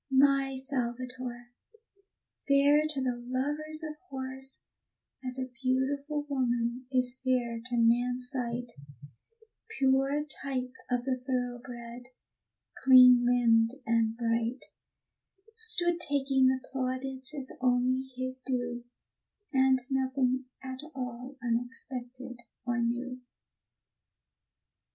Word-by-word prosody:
My 270 0 +4
Salvator, 250 -2 -4 1.0
fair 285 +2 +5
to 280 -3 +1
the 250 -2 0
lovers 295 +5 -2
of 305 0 -7
horse, 265 0 -3 0.6
As 255 0 -3
a 260 -1 -4
beautiful 280 +3 0
woman 245 -2 -1
is 255 -1 +1
fair 240 -3 0
to 250 -1 -2
man's 245 +2 +2
sight 245 -2 -3 1.1
Pure 270 +2 +2 0.2
type 255 -2 -2 0.2
of 245 0 0
the 265 -1 +1
thoroughbred, 245 -1 -4 0.8
clean 250 -2 +9
limbed 235 -1 +4
and 225 0 +1
bright, 230 +1 -1 0.9
Stood 360 -7 +2
taking 275 -4 +3
the 260 0 +2
plaudits 260 +1 -2
as 270 -2 -6
only 255 +1 +2
his 255 0 -4
due, 245 -2 -2 0.7
And 265 0 +5
nothing 260 -1 +1 0.2
at 260 0 -6 0.2
all 250 +1 -6
unexpected 245 +1 -4 0.3
or 240 -1 0
new. 245 +2 -2
255 Hz, 100 wpm, -30 LUFS, 245-270 Hz, 1.1 s, clean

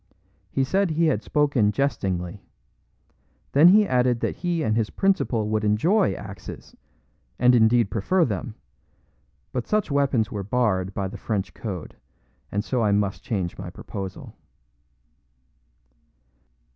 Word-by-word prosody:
He 135 - 0
said 190 +7 +1
he 165 +1 +1
had 155 - +1
spoken 140 -8 +2
jestingly. 95 -8 -2 1.1
Then 150 +5 +7
he 210 +3 +6
added 125 -1 +2
that - - -2
he 175 -2 -1
and 110 -4 +1
his 110 -2 0
principal 185 - 0
would 110 0 0
enjoy 165 - +2
axes, 100 -2 -10 0.6
and 125 0 +5
indeed 115 -2 +4
prefer 165 - +2
them, 105 0 -4 1.0
but 125 -2 -3
such 210 -7 0
weapons 135 -6 +1
were 105 - -3
barred 100 -4 0
by 100 -1 -1
the 95 - -9
French 100 -4 -3
code, 95 -8 -6 0.6
and 100 +1 -1
so 125 +1 -1
I 105 -2 +2
must 100 -1 0
change 95 -9 -3
my 95 -2 -6
proposal. 95 +1 -8
115 Hz, 135 wpm, -24 LUFS, 100-140 Hz, 1.1 s, Then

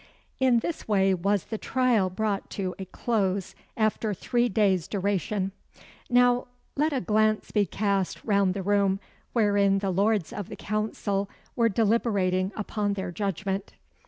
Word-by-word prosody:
In 255 -3 +4
this 335 - -4
way 195 -2 +3
was 195 +2 +1
the 220 - -5
trial 245 -7 +2
brought 200 +1 -2
to 185 -2 -2
a 190 - -4
close, 195 -2 -1 0.2
after 215 -1 0
three 240 +5 +1
days' 190 -5 +2
duration. 200 0 -1 0.6
Now, 245 0 +4 0.3
let 305 +3 +2
a 275 - 0
glance 215 +3 +1
be 205 -2 +2
cast 200 0 -1
round 200 -3 +2
the 195 - -3
room 200 -1 +2 0.3
wherein 205 -3 +3
the 195 -1 -1
lords 200 -1 +1
of 205 -3 -5
the - - -6
Council 205 -1 -2 0.3
were 230 -1 +3
deliberating 200 -4 +1
upon 210 -1 -1
their 190 -2 -4
judgment. 195 +1 -3
205 Hz, 145 wpm, -27 LUFS, 195-220 Hz, 0.6 s, In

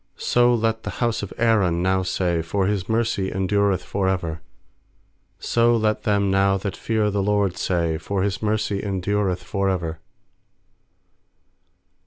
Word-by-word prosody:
8So 120 -1 +3
let 110 0 0
the - - -6
bouse 120 -2 0
of 100 - -6
Aaron 100 -7 +2
now 95 0 +2
say, 90 -2 0
For 95 +4 -1
His 100 -1 -1
mercy 110 -4 0
endureth 95 0 +1
for 95 +1 -1
ever. 85 -4 -2 1.0
4So 120 0 +2
let 110 0 0
them 100 -2 +2
now 95 0 +3
that 95 0 -4
fear 110 -2 0
the* 100 0 0
LORD 100 -2 +1
say, 85 -3 -1
For 95 +3 -2
His 100 -1 -2
mercy 105 -2 -1
endureth 100 -1 -1
for 100 -2 -1
ever. 85 -4 -2
100 Hz, 145 wpm, -23 LUFS, 95-105 Hz, 1.0 s, 8So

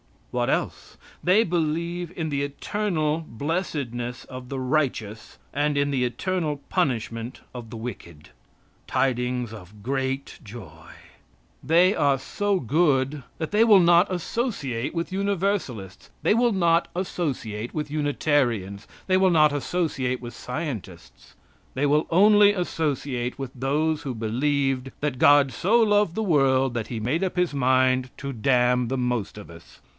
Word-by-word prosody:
What - - 0
else? - - -3 0.3
They 190 +5 +5
believe 170 0 -2
in 160 -2 -3
the 140 -1 -1
eternal 155 +2 -1
blessedness 125 -4 -3
of 130 -1 -9
the 135 +1 -4
righteous, 125 -6 -2 0.2
and 145 +1 0
in 140 0 +1
the 130 -2 +1
eternal 155 +2 -2
punishment 120 - -2
of 120 -3 -8
the 115 - -8
wicked. 85 -9 -8 0.6
Tidings 125 -2 -1
of 105 0 -12
great 135 +2 -3
joy! 90 - -11 0.7
They 175 +6 +4
are 140 -7 +2
so 200 +8 -1
good 140 0 +1 0.2
that 160 - -3
they 215 +2 +4
will 205 -4 +7
not 175 +2 +5
associate 175 - -3
with 165 +1 -3
Universalists. 190 - -2
They - - +4
will 235 0 +3
not 170 -2 +2
associate 130 - -3
with 150 -2 -4
Unitarians. 135 -9 0 0.2
They 185 -1 +3
will 190 -1 +4
not 155 -3 +5
associate 145 -4 -1
with 120 -1 -8
scientists. 105 - -7 0.4
They 135 +3 0
will 150 +2 +2
only 205 +3 +6
associate 145 -9 -2
with 135 -2 -5
those 150 +5 0
who 130 -3 -4
believed 135 +3 -1
that 145 -4 -2
God 145 -2 +6
so 205 - +2
loved 205 -5 +3
the 220 - -1
world 135 - +2
that 115 -2 -3
He 115 -2 -5
made 145 - 0
up 185 - -2
his 180 -4 +1
mind 130 -1 +2
to 140 0 -5
damn 125 +1 +2
the 135 +3 -2
most 125 -5 -2
of 105 - -10
us. 85 +1 -16
140 Hz, 145 wpm, -25 LUFS, 125-170 Hz, 0.7 s, will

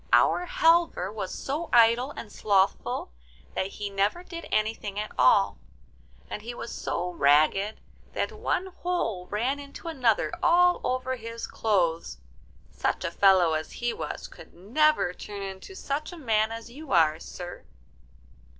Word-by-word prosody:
'Our 360 - +4
Halvor 325 - +3
was 195 -4 -4
so 305 +4 -4
idle 235 +2 +5
and 215 - -7
slothful 195 - +1 0.4
that 190 - -1
he 200 +1 -6
never 200 - 0
did 335 -2 -8
anything 215 -2 -1
at 215 - -4
all, - - +4 0.7
and - - -6
he 240 +3 -7
was 235 - -6
so 180 +1 -3
ragged 155 +7 +3 0.3
that - - -1
one 430 -4 -1
hole 350 - -3
ran 245 +7 -1
into 285 +4 -10
another 245 -9 +1
all 355 +1 +4
over 255 0 -1
his 230 0 -6
clothes. 175 -7 0 0.5
Such - - -1
a 170 - -1
fellow 185 -3 +5
as 155 0 -3
he 240 0 -2
was - - -5
could - - -15
never 240 - +2
turn 200 +1 -7
into 195 - -8
such 300 -2 -3
a 350 - -9
man 220 -6 +1
as 230 +1 -7
you 295 +3 -10
are, 160 -2 +4
sir. 175 +1 -8
225 Hz, 150 wpm, -27 LUFS, 190-290 Hz, 0.7 s, idle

